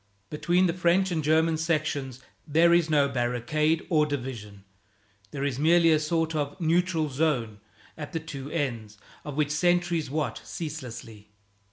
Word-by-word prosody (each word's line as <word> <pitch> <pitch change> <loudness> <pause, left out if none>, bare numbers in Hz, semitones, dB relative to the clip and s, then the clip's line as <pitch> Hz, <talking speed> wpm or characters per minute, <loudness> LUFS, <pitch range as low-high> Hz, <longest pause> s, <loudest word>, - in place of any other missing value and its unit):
Between 175 +4 +2
the 170 - +1
French 185 +2 +2
and 160 -3 -1
German 160 +2 +2
sections 150 -5 -2 0.3
there 165 +3 +4
is 170 -2 +3
no 145 -2 +3
barricade 135 +5 0
or 150 -3 +2
division. 120 -8 -6 0.7
There 140 +5 -5
is 140 -2 -2
merely 165 +2 +4
a 155 - +4
sort 165 +1 -1
of 145 +1 -3
neutral 170 -1 +1
zone, 130 -7 -1 0.4
at 150 -2 -7
the 165 - -2
two 145 -4 -8
ends 120 -9 -3 0.3
of 145 -2 -7
which 150 -1 +1
sentries 175 -1 +1
watch 150 +1 -3
ceaselessly. 120 -9 -8
155 Hz, 150 wpm, -27 LUFS, 135-165 Hz, 0.7 s, there